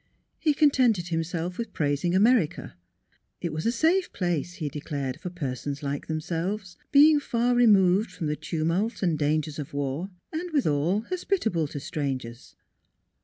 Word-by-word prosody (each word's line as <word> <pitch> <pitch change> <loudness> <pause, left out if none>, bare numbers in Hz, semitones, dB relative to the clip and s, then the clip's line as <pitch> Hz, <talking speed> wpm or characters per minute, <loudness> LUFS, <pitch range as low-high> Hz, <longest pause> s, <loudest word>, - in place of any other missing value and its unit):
He 305 -3 +2
contented 250 - +3
himself 170 +2 -2
with 230 -3 -4
praising 145 +4 0
America. 200 - +2 0.6
It 170 -3 -3
was 155 +6 -2
a - - +3
safe 330 +9 +2
place, 175 -2 -2
he 155 -5 -3
declared, 140 -2 -4
for 180 - -4
persons 140 -3 -4
like 140 0 -3
themselves, 175 +5 -3 0.2
being 295 +1 +7
far 245 -3 0
removed 205 -4 +4
from 165 - -6
the 150 0 0
tumult 175 +9 -1
and 170 -4 +2
dangers 155 0 0
of 145 -1 -6
war 145 +6 -2 0.2
and 345 +3 -3
withal 185 - +1
hospitable 235 - -1
to 145 - -6
strangers. 130 -5 -5
175 Hz, 145 wpm, -26 LUFS, 150-230 Hz, 0.6 s, being